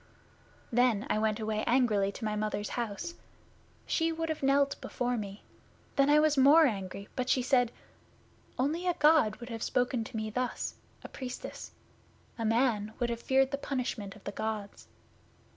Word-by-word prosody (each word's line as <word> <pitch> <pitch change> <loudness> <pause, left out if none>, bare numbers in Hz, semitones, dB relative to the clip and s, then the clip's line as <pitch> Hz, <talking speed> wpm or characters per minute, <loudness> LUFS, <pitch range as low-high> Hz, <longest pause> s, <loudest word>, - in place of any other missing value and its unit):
'Then 240 -3 +3
I 215 - +2
went 215 0 0
away 215 -1 -1
angrily 220 -6 +3
to 220 - -6
my 215 0 -1
Mother's 210 -1 -2
house. 235 - -4 0.7
She 330 0 +1
would 325 0 -3
have 315 - -3
knelt 280 +1 +2
before 245 0 -2
me. 205 -2 -6 0.5
Then 275 +1 +4
I 300 +1 +6
was 300 -2 +3
more 295 +5 +7
angry, 200 -4 -3
but 255 -1 -2
she 255 - +3
said, 245 -2 +3 0.9
"Only 315 +8 0
a 355 - +2
God 300 -8 +4
would 240 0 -10
have 225 -2 -5
spoken 250 -1 0
to 230 - -6
me 215 0 -3
thus, 250 +2 -2 0.3
a - - -6
Priestess. 255 -2 -7 0.7
A 225 - -1
man 220 -2 +1
would 240 -1 -1
have 235 0 -4
feared 265 +1 +3
the 280 - -2
punishment 245 -8 -3
of 210 - -16
the - - -4
Gods." 215 -1 -5
245 Hz, 170 wpm, -30 LUFS, 215-275 Hz, 0.9 s, more